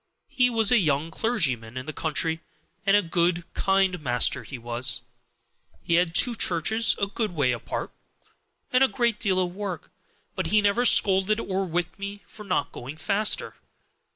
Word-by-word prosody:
He 250 -1 +2
was 225 -2 +2
a 245 - +5
young 155 -2 0
clergyman 130 - -1
in 130 - -5
the 155 - -6
country, 160 +1 -1 0.5
and 200 +1 +6
a 205 - +1
good, 170 0 +1
kind 190 -3 +1
master 120 -4 +2
he 130 - -8
was. 120 +1 -1 0.8
He 170 - -1
had 170 0 +2
two 245 - +4
churches 220 +3 +1
a 200 - +2
good 200 -1 -3
way 140 -5 +2
apart, 120 -3 -5 0.8
and 255 +1 +5
a - - +5
great 235 -4 -1
deal 190 -2 +1
of 180 -1 -1
work, 190 -4 -6 0.4
but - - -3
he 215 - +3
never 205 +4 +2
scolded 195 -1 +4
or 195 -2 -2
whipped 175 +1 -3
me 200 +1 -7
for 210 - -11
not 185 -7 -1
going 135 +5 -9
faster. 205 +6 0
185 Hz, 170 wpm, -25 LUFS, 155-210 Hz, 0.8 s, and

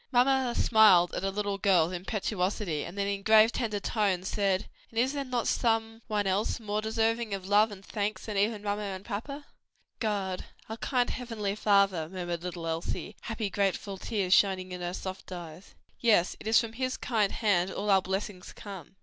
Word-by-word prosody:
Mamma 255 -1 +3
smiled 200 -6 +5
at - - -2
her 195 - 0
little 200 0 -2
girl's 180 -4 +3
impetuosity, 185 -3 -2
then 175 +4 -9
in 200 0 -2
grave, 220 +2 +6
tender 220 -5 -2
tones, 195 -4 0
said, 195 -2 0 0.2
"And 225 - -12
is 255 +4 +2
there 285 -1 -2
not 250 -3 -2
some 225 -1 0
One 210 -2 0
else 195 +4 0
more 210 -1 -2
deserving 225 0 0
of 190 -1 -8
love 210 +2 +5
and 195 -1 -10
thanks 210 0 -3
than 215 - -4
even 205 +1 +1
papa 205 0 -1
and 195 -1 -5
mamma?" 275 +7 -5 0.5
"God, 195 -4 -2 0.2
our 220 - -6
kind 245 0 0
heavenly 225 -5 -3
Father," 200 -6 +2
murmured 175 -2 -4
little 175 -1 -5
Elsie, 165 +5 -3
happy, 220 -3 -3
grateful 195 0 -1
tears 195 -4 0
shining 190 -2 +3
in 180 0 -6
her 175 +1 -3
soft 190 0 -7
eyes. 175 0 -9 0.2
"Yes, 210 -7 +3
it - - -8
is 220 0 +6
from 230 -1 -3
his 255 +2 -2
kind 215 -5 +1
hand 195 -5 +2
all 205 +1 -1
our 190 -1 +5
blessings 190 0 -4
come." 195 -2 -10
205 Hz, 185 wpm, -29 LUFS, 190-225 Hz, 0.5 s, grave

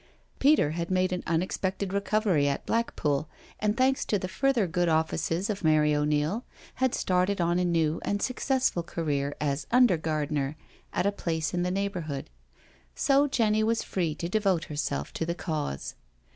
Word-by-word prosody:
Peter 280 - +4
had 170 +1 -3
made 185 0 +1
an 180 - -2
unexpected 185 +3 -1
recovery 200 -6 +2
at 140 - -2
Black 230 +1 0
pool, 150 +1 0 0.3
and, 210 +1 0
thanks 265 +1 +3
to 210 - 0
the 185 - -4
further 260 +1 +1
good 175 0 0
offices 165 +3 0
of 205 -3 -3
Mary 155 -1 +4
O'Neil, 150 +8 0 0.4
had 260 -2 +2
started 185 +2 +1
on 175 +1 +2
a - - +2
new 165 -2 +1
and 205 - -1
successful 255 -4 0
career 145 -4 -2
as 145 0 -1
under 245 -7 +5
gardener 150 -2 -1 0.4
at - - 0
a 200 - +3
place 160 -6 -2
in 175 - 0
the 180 - 0
neighbourhood. 180 -7 -3 0.6
So 280 +1 +3
Jenny 220 -5 +2
was 225 +1 +1
free 170 -5 -1
to 170 - -4
devote 190 -4 +1
herself 145 - -3
to - - -2
the 170 +1 -2
Cause. 150 - -3
175 Hz, 170 wpm, -28 LUFS, 155-205 Hz, 0.6 s, under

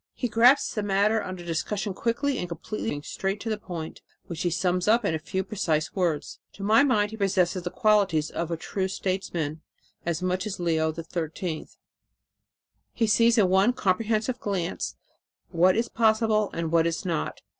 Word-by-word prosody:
"He 250 - -1
grasps 245 +5 +4
the 210 - -1
matter 205 +2 +2
under 185 -2 -7
discussion 195 +5 -2
quickly 245 +6 -1
and 180 - -4
completely, 175 +6 -4
going 145 0 -4
straight 195 +5 -3
to 225 - -3
the 215 - -2
point, 170 -5 -7 0.2
which 170 -1 -6
he 175 - +1
sums 180 +1 0
up 225 +1 +4
in 185 - +1
a 160 - -1
few 190 +4 -3
precise 165 -7 -1
words. 170 -6 -1
To 195 - -9
my 220 +5 +5
mind 210 -7 +2
he 220 - -7
possesses 190 -3 +1
the 175 - -4
qualities 195 -7 +2
of 170 - -3
a 170 - -2
true 190 +3 -2
statesman 180 -5 -3 0.4
as 170 +1 -2
much 185 +2 -1
as 195 -3 -5
Leo 160 -2 +1
XIII. 165 0 -4 1.3
He 230 - +1
sees 230 +2 +4
in 205 -4 +5
one 190 +6 +4
comprehensive 220 +3 0
glance 190 -4 -3 0.6
what 180 +2 +4
is 235 +1 +1
possible 220 -2 +2
and 165 -1 -3
what 165 0 +4
is 170 +2 -3
not. 120 - -2
190 Hz, 175 wpm, -26 LUFS, 170-215 Hz, 1.3 s, my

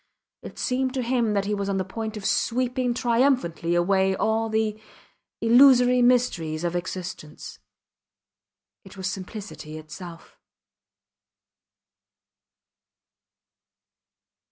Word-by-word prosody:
It - - -10
seemed 260 +1 -1
to 255 - -1
him 235 -3 0
he 205 +1 -2
was 200 -1 -2
on 195 - 0
the 190 - 0
point 220 +2 -5
of 200 - -8
sweeping 250 +2 0
triumphantly 235 - +1
away 190 +2 +2
all 225 +2 0
the 220 -1 -1 0.6
illusory 250 +1 +6
mysteries 235 -11 +1
of 175 0 -1
existence. 175 -3 -6 1.2
It 195 0 -14
was 190 - -6
simplicity 190 -4 -7
itself. 165 +2 -11
215 Hz, 95 wpm, -25 LUFS, 185-245 Hz, 1.2 s, illusory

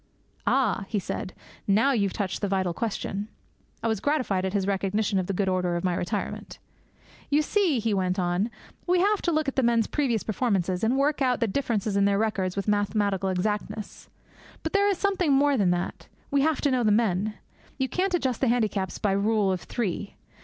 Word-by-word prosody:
'Ah,' 260 -7 +2
he 215 - -2
said, 190 0 -4 0.4
'now 220 +8 +4
you've 200 -7 +1
touched 195 -2 -3
the 205 - 0
vital 190 -2 0
question.' 205 -1 -3 0.6
I - - +1
was 220 -3 0
gratified 245 -10 0
at 190 - -2
his 200 -2 +1
recognition 200 +1 0
of 180 - -2
the - - -1
good 195 +1 0
order 180 -2 0
of 175 - -2
my 180 -1 +1
retirement. 175 +1 -4 0.7
'You 295 +2 +3
see,' 360 -4 +2
he 225 -1 0
went 185 -1 0
on, 180 +4 0 0.4
'we 360 0 +3
have 410 +2 +2
to 345 - 0
look 310 -2 0
up 275 - 0
the 265 - +1
men's 235 -2 +3
previous 250 -8 0
performances 195 -5 0
and 240 +4 +2
work 290 +1 +1
out 255 -2 +2
the 235 - +2
differences 215 -3 -1
in 200 0 +3
their 200 0 +3
records 200 -4 0
with 200 +1 -3
mathematical 205 -2 +1
exactness. 210 +2 -3 0.5
But - - -3
there 405 0 +4
is 395 - +1
something 370 -7 +1
more 285 +1 +4
than 200 -7 +2
that. 175 0 -2 0.2
We 280 0 +3
have 315 +1 +1
to 285 - +2
know 255 -1 +2
the 215 - +3
men. 210 -1 +1 0.4
You 265 -1 0
can't 370 +5 0
adjust 260 -8 -1
the 265 - +3
handicaps 215 -6 0
by 205 - 0
rule 200 0 +2
of 185 - -2
three. 205 -3 -3
210 Hz, 205 wpm, -26 LUFS, 195-265 Hz, 0.7 s, now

